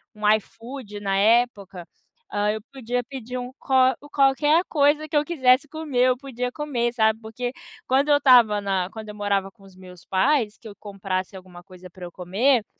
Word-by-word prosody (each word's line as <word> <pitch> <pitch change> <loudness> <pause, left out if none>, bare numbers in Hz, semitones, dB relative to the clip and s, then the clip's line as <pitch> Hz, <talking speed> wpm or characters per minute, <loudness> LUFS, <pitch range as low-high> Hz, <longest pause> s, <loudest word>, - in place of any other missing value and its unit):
um 210 0 -2
iFood 225 0 -8
na 195 -1 -1
época, 205 -5 +1 0.5
hã, 205 0 +1
eu 215 - -4
podia 245 -1 -3
pedir 250 -1 -7
um 250 +1 -6
qual 260 -1 +3 0.2
qualquer 295 +5 +3
coisa 295 +1 +2
que 300 - -6
eu 295 - +4
quisesse 275 -3 +2
comer, 280 -5 0
eu 250 - +1
podia 250 -2 -5
comer, 250 -5 -2
sabe? 220 -1 +2
Porque 245 +3 -5 0.3
quando 275 +3 +2
eu 290 - +6
estava 240 -7 +5
na 190 -2 -1
quando 220 -1 -9
eu 210 - -8
morava 200 -2 -1
com 195 - -24
os 190 -1 -17
meus 180 -2 -14
pais, 220 +2 +1
que 225 - -13
eu 205 - -11
comprasse 195 -2 -5
alguma 180 -1 -14
coisa 185 -1 -14
pra 180 -1 -10
eu 175 - -9
comer, 210 +7 +1
230 Hz, 190 wpm, -23 LUFS, 200-265 Hz, 0.5 s, eu